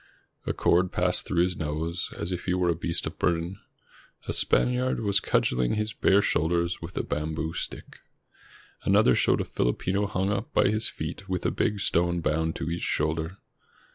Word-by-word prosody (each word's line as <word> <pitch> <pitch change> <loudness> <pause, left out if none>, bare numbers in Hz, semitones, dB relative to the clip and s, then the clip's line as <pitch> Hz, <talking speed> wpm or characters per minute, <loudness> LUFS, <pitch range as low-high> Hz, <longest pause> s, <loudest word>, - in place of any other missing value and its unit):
A - - +2
cord 90 +1 +2
passed 90 0 0
through 85 -2 +2
his 90 0 -1
nose, 80 +3 -3
as 85 - -3
if 90 -1 -4
he 90 - +1
were 90 -1 +1
a 85 - +2
beast 85 +1 -2
of - - -6
burden. 85 +2 0 0.7
A - - 0
Spaniard 125 +1 +2
was 100 -2 +3
cudgeling 60 - +1
his 105 0 -1
bare 100 +1 +3
shoulders 85 +1 0
with 80 +2 -8
a - - 0
bamboo 80 +2 -3
stick. - - -6 0.8
Another 65 - +4
showed - - +2
a - - -3
Filipino 95 +11 0
hung 95 0 -1
up 100 +3 -3
by - - +4
his 110 +1 +1
feet 85 +5 -6
with 90 -1 -2
a - - +2
big 105 -1 0
stone 85 -1 +1
bound 80 0 0
to 85 - -3
each 85 - -3
shoulder. 80 +4 -1
85 Hz, 180 wpm, -27 LUFS, 80-95 Hz, 0.8 s, Another